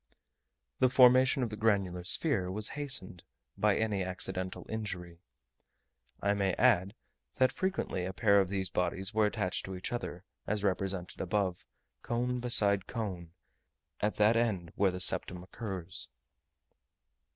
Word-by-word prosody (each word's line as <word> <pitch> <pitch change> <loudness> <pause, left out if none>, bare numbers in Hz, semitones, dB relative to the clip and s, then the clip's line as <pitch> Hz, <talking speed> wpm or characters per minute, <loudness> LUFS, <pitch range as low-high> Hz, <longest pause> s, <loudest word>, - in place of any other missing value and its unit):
The 130 - +4
formation 130 +1 +5
of 115 - -3
the - - -4
granular 100 -5 0
sphere 95 - +1
was 105 +3 0
hastened 135 -12 -2 0.3
by 105 -2 +2
any 105 -4 0
accidental 95 0 -3
injury. 90 -6 -6 1.0
I 100 +1 +3
may 100 -2 0
add, 100 -5 +3 0.4
that 130 0 +3
frequently 185 - -2
a 95 - -3
pair 100 0 +3
of 95 - -2
these 95 -1 -2
bodies 95 +3 0
were 110 -1 +3
attached 90 -2 -2
to 95 - -6
each 90 - -5
other, 120 -7 -5 0.2
as 105 0 -1
represented 95 -2 -2
above, 95 -1 -1 0.3
cone 125 +1 -1
beside 100 -5 +3
cone, 95 -8 -5 0.7
at 105 +1 0
that 105 +2 +4
end 100 -8 0
where 100 -1 +3
the 90 0 -5
septum 90 0 0
occurs. 95 -3 -5
100 Hz, 140 wpm, -31 LUFS, 90-115 Hz, 1.0 s, formation